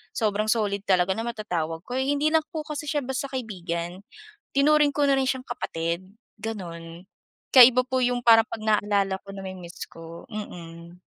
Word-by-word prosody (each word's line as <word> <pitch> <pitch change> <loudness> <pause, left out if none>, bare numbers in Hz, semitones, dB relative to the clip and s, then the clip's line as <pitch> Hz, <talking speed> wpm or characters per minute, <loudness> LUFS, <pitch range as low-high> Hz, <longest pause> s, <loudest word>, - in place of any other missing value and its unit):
Sobrang 215 -1 0
solid 210 -3 +1
talaga 185 0 +3
na 225 +4 -2
matatawag 175 -7 -3
ko, 250 +1 -3
hindi 290 +3 +1
lang 320 -1 +3
po 315 -4 -5
kasi 300 -1 -6
siya 290 -1 0
basta 265 +2 -3
kaibigan, 180 -8 -4 0.5
tinuring 295 +1 +4
ko 285 0 +1
na 275 - +4
rin 265 -1 +1
siyang 260 -1 -4
kapatid, 165 +2 -3 0.4
ganun. 170 -5 -7 0.5
Kaya 255 -1 +11
iba 255 +1 +1
po 255 0 0
yung 245 0 +2
parang 225 -1 +6
pag 220 - -5
naaalala 205 -2 +2
ko 200 - -22
na-mi-miss 185 -3 -8
ko, 165 0 -11
mm. 170 -4 -9
215 Hz, 165 wpm, -25 LUFS, 175-260 Hz, 0.5 s, Kaya